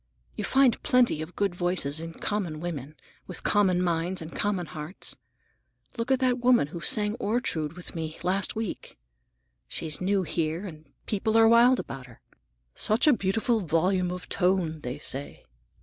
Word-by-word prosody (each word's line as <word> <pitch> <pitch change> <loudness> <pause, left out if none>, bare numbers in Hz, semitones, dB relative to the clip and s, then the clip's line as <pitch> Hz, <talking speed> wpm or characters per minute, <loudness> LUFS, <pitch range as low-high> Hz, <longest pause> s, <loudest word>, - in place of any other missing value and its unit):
You - - -4
find 265 -3 +3
plenty 250 - +3
of 160 +3 -8
good 200 -3 0
voices 175 -5 0
in 165 0 -6
common 180 -5 -3
women, 155 -4 -5 0.3
with 180 - -6
common 185 -4 +3
minds 175 +1 0
and 160 0 -8
common 200 -4 0
hearts. 155 +3 -4 0.8
Look 230 +1 -3
at 265 - +4
that 250 -1 +2
woman 245 - +4
who 170 +2 -7
sang 210 +3 +2
Ortrude 175 -9 -1
with 180 0 -9
me 160 -1 -5
last 190 +2 0
week. 220 - -5 0.7
She's 155 +1 -2
new 195 +1 +1
here 165 +2 -2
and 155 -4 -9
the 140 - -31
people 215 +2 0
are 225 0 +7
wild 240 +3 +6
about 135 -2 -7
her. 120 - -16 0.5
'Such 215 +3 +2
a 300 - +7
beautiful 225 +2 +1
volume 180 +1 +1
of 180 0 -6
tone!' 180 -4 +1
they 125 +1 -4
say. 140 -1 -3
180 Hz, 165 wpm, -27 LUFS, 160-215 Hz, 0.8 s, are